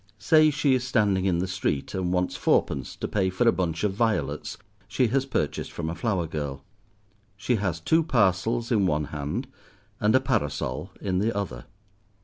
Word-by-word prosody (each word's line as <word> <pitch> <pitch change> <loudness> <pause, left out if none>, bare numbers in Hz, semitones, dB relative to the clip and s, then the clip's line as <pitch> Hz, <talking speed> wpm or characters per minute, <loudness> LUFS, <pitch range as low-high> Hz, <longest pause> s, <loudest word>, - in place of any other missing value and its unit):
Say 155 +4 +5
she 145 -2 +2
is 130 -1 +1
standing 105 -7 +1
in 90 -3 +2
the 90 +2 -1
street, 90 -6 -2
and 90 -1 -1
wants 90 0 0
fourpence 70 -4 0
to - - -4
pay 95 -3 0
for 95 +6 +1
a - - +7
bunch 85 -2 -2
of 105 -2 +1
violets 110 +1 -1 0.3
she 110 +3 +1
has 135 +3 0
purchased 75 - -2
from 80 -1 -4
a - - -3
flower 90 -1 -1
girl. 70 -3 -5 0.7
She 115 +4 0
has 95 -5 -2
two 160 - +3
parcels 115 - +1
in 100 -5 +3
one 75 -2 +1
hand, 70 0 -3 0.5
and 105 +3 +3
a - - +7
parasol 130 - -2
in 95 -2 0
the 110 +4 +1
other. 65 -11 -4
95 Hz, 180 wpm, -26 LUFS, 85-120 Hz, 0.7 s, a